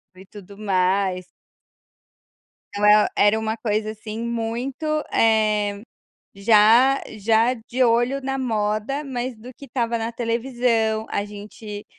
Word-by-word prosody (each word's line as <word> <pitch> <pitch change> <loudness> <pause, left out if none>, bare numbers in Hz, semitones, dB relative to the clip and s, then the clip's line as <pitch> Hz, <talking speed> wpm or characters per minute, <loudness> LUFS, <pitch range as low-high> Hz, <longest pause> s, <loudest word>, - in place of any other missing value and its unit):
e 190 +1 -14
tudo 200 0 -13
mais. 185 -2 0 1.5
Então 205 +1 -1
e 210 0 +7
era 205 +2 +4
uma 220 0 -2
coisa, 215 -1 -1
assim, 215 0 -8
muito, 235 +5 -4 0.3
eh, 210 -2 +2 0.5
já 225 +6 +5 0.2
já 225 +3 +2
de 240 +1 -5
olho 240 +3 +2
na 270 0 -3
moda, 220 +2 -1
mas 250 -2 -4
do 245 +4 -12
que 280 - -12
estava 235 -2 -2
na 225 +1 -3
televisão, 230 -2 0
a 200 - -1
gente 210 0 -9
220 Hz, 125 wpm, -22 LUFS, 210-240 Hz, 1.5 s, e